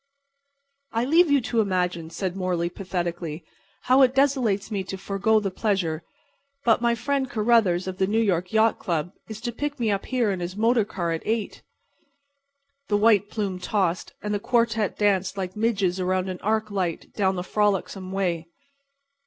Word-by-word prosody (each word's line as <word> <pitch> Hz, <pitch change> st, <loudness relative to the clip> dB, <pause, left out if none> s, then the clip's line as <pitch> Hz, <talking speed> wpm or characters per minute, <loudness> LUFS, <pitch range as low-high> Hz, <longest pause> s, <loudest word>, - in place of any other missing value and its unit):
"I 230 Hz, +2 st, +1 dB
leave 330 Hz, +4 st, +5 dB
you 285 Hz, -1 st, +4 dB
to 230 Hz, -1 st, +1 dB
imagine," 180 Hz, -4 st, -1 dB
said 180 Hz, +2 st, -3 dB
Morley, 180 Hz, -2 st, -1 dB
pathetically, 175 Hz, -4 st, -4 dB, 0.4 s
"how 260 Hz, +2 st, +5 dB
it 260 Hz, -1 st, +4 dB
desolates 255 Hz, -8 st, +2 dB
me 200 Hz, -2 st, -1 dB
to 190 Hz, -, -5 dB
forego 200 Hz, +3 st, +1 dB
the 200 Hz, -2 st, -2 dB
pleasure. 185 Hz, -6 st, -1 dB, 0.6 s
But 230 Hz, -1 st, +4 dB
my 235 Hz, -1 st, +2 dB
friend 275 Hz, +2 st, -1 dB
Carruthers, 215 Hz, -6 st, +2 dB
of 185 Hz, 0 st, -5 dB
the 190 Hz, -, +2 dB
New 215 Hz, +3 st, 0 dB
York 180 Hz, -5 st, +1 dB
Yacht 220 Hz, 0 st, +3 dB
Club, 170 Hz, -3 st, -2 dB, 0.2 s
is 220 Hz, -1 st, -6 dB
to 240 Hz, -1 st, -2 dB
pick 290 Hz, +3 st, -4 dB
me 225 Hz, -3 st, +1 dB
up 200 Hz, -1 st, -2 dB
here 245 Hz, -5 st, +1 dB
in 190 Hz, -, -3 dB
his 175 Hz, +2 st, -5 dB
motor 225 Hz, 0 st, +3 dB
car 175 Hz, -4 st, -3 dB
at 165 Hz, -, -2 dB
8." 220 Hz, -1 st, -2 dB, 1.3 s
The 205 Hz, -, +2 dB
white 205 Hz, -2 st, +4 dB
plume 200 Hz, -5 st, -3 dB
tossed, 185 Hz, -1 st, -1 dB
and 210 Hz, 0 st, -2 dB
the 205 Hz, -, 0 dB
quartet 230 Hz, -2 st, +1 dB
danced 200 Hz, -2 st, +1 dB
like 185 Hz, -1 st, -4 dB
midges 200 Hz, -5 st, 0 dB
around 185 Hz, 0 st, 0 dB
an 185 Hz, -, -5 dB
arc 215 Hz, 0 st, 0 dB
light 180 Hz, -5 st, -3 dB
down 190 Hz, -2 st, +1 dB
the 180 Hz, -, -3 dB
frolicsome 195 Hz, -1 st, -1 dB
way. 175 Hz, -4 st, -1 dB
200 Hz, 175 wpm, -25 LUFS, 185-225 Hz, 1.3 s, leave